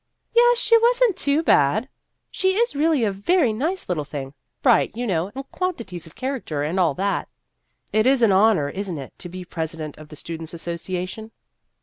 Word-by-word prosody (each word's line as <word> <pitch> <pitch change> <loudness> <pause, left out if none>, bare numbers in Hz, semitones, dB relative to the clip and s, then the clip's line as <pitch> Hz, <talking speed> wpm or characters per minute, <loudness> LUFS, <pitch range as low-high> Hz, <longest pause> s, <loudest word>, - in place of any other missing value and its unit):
"Yes, 485 +1 +5
was 470 +2 +5
n't 480 - +5
it 370 - -14
too 290 +1 +1
bad! 215 - +3 0.4
She 380 0 +1
is 470 -5 +1
really 300 -3 +2
a 210 - +2
very 240 - +2
nice 320 - -2
little 170 -5 -1
thing 140 -2 -7 0.3
bright, 240 -3 +3
you 245 - -2
know, 185 -2 -1
and 270 0 -6
quantities 230 - -3
of 160 - -17
character, 255 - -3
and 165 +6 -1
all 165 -6 +2
that." 200 +1 -1 0.6
"It 215 +2 +3
is 265 -2 +4
an 220 - +5
honor, 195 -6 +4
is 195 +5 -4
n't 165 - -4
it, 135 -2 -8
to 175 - -7
be 180 +1 -8
presi 165 -2 -4
dent 155 -2 -6
of 155 -1 -12
the 150 - -10
Students' 165 +1 -7
Association?" 180 +5 -4
200 Hz, 200 wpm, -23 LUFS, -, 0.6 s, Yes